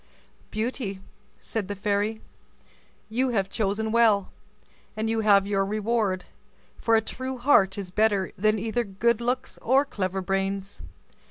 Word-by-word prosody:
"Beauty," 215 -3 -3 0.4
said 220 -4 -3
the 205 - -4
fairy, 205 +2 -1 0.9
"you 255 +4 0
have 195 -5 0
chosen 220 +1 -1
well, 220 -4 +3 0.7
and 220 +1 0
you 225 - 0
have 200 -2 +5
your 200 -1 +1
reward, 210 -2 0 0.5
for 230 - +2
a 220 - +4
true 260 +3 -5
heart 225 -7 +4
is 190 -3 -5
better 205 -1 +2
than 215 +2 +2
either 225 +3 -1
good 225 +3 0
looks 250 +2 -2
or 265 +4 +3
clever 190 -6 -3
brains. 195 +1 -2
215 Hz, 140 wpm, -26 LUFS, 195-230 Hz, 0.9 s, have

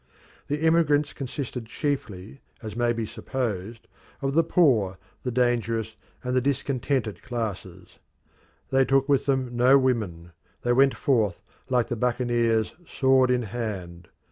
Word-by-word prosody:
The 150 +2 -2
emigrants 150 -3 +3
consisted 130 -3 -5
chiefly, 135 -5 -4 0.2
as 110 -1 -6
may 120 0 +2
be 115 -1 -2
supposed, 115 -2 -4 0.3
of 135 0 -2
the 165 +2 +4
poor, 120 - +3 0.2
the 125 - -3
dangerous, 115 -3 0 0.3
and 125 0 -1
the 130 - +3
discontented 130 -3 -1
classes. 95 -7 -6 0.7
They 135 0 +4
took 135 +1 +2
with 140 -1 +2
them 130 -3 0
no 125 +3 +6
women; 105 -11 -1 0.3
they 120 - +2
went 135 +2 +4
forth, 110 -9 +1 0.3
like 125 -2 +2
the 120 - -1
buccaneers, 120 -2 +1
sword 130 -1 +3
in 125 -1 +2
hand. 95 -6 -5
120 Hz, 135 wpm, -26 LUFS, 110-135 Hz, 0.7 s, no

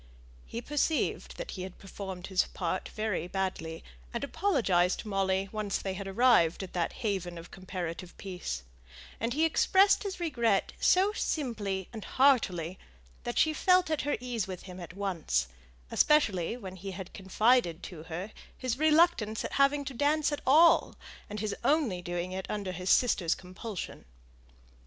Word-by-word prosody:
He 235 - -5
perceived 295 +1 -1
that - - -5
he 185 - -6
had 185 0 -7
performed 190 -2 -7
his 190 -2 +2
part 185 0 -3
very 215 -5 -2
badly, 180 -4 -3 0.3
and - - -3
apologized 195 - +1
to - - -11
Molly 195 -1 +1
when 215 -1 -3
once 200 - 0
they 190 - -3
had 195 +1 -6
arrived 195 -5 +4
at 185 - -8
that 175 -2 0
haven 180 -4 -1
of 165 +1 -10
comparative 180 -2 -6
peace; 180 - -5 0.6
and 230 +2 -1
he 315 +4 +3
expressed 385 +4 +4
his 390 -3 -4
regret 235 - +1
so 385 +3 +4
simply 210 - -2
and 220 -3 -6
heartily 190 - +2 0.5
that - - -3
she 315 - +4
felt 365 0 +3
at 310 - +1
her 290 - -1
ease 240 -5 -3
with 185 -2 -7
him 185 -1 -9
at 175 0 -9
once, 165 - -1 0.4
especially 225 - +3
when 190 -5 -8
he 195 +2 -6 0.2
confided 195 -2 +2
to 170 -4 -8
her 175 +6 -6 0.3
his 255 0 -2
reluctance 310 -9 +3
at - - -5
having 285 +1 +3
to 275 - -5
dance 295 +4 +2
at 290 - -3
all, 320 +5 +6 0.3
and 210 0 -4
his 215 -2 -2
only 255 - +2
doing 175 +1 -3
it 190 0 -4
under 200 -3 -3
his 180 0 -4
sister's 185 -9 +3
compulsion. 185 +2 -7
200 Hz, 160 wpm, -30 LUFS, 185-270 Hz, 0.6 s, all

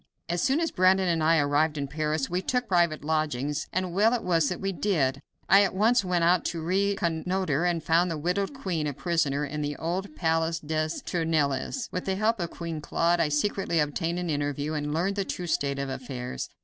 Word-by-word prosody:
As 175 +1 -1
soon 270 +4 +2
as 330 -1 0
Brandon 185 +1 +3
and 165 -2 +1
I 165 +1 +4
arrived 150 +1 +2
in 140 -1 -2
Paris 150 0 -1
we 180 +1 -1
took 250 +4 -1
private 170 -6 +2
lodgings, 150 -2 -1
and 185 -1 -2
well 215 +6 +4
it 240 - -3
was 165 -5 +2
that 180 - -4
we 195 0 -1
did. 150 -9 0 0.3
I 195 - +7
at 195 -2 +1
once 225 +4 +3
went 180 -2 0
out 175 +1 +4
to 170 - -2
reconnoiter, 180 -2 0
and 170 -3 0
found 165 +3 +3
the 165 - -3
widowed 180 +6 -1
queen 185 - -3
a 145 - -2
prisoner 150 -2 0
in 150 +1 -4
the 145 0 -2
old 185 - -3
palace 165 0 0
des 155 0 -1 0.2
Tournelles. 160 - -1
With 180 - -4
the 190 - 0
help 215 +2 +1
of 170 -2 -2
Queen 165 -3 -5
Claude 170 +3 +1
I 155 - +2
secretly 170 +2 0
obtained 165 +3 -1
an 175 -2 -2
interview, 145 +1 -2
and 150 -1 -2
learned 185 +6 0
the 200 - +1
true 180 -1 -5
state 140 -4 0
of 140 0 -3
affairs. 125 -1 -5
165 Hz, 210 wpm, -27 LUFS, 150-185 Hz, 0.3 s, I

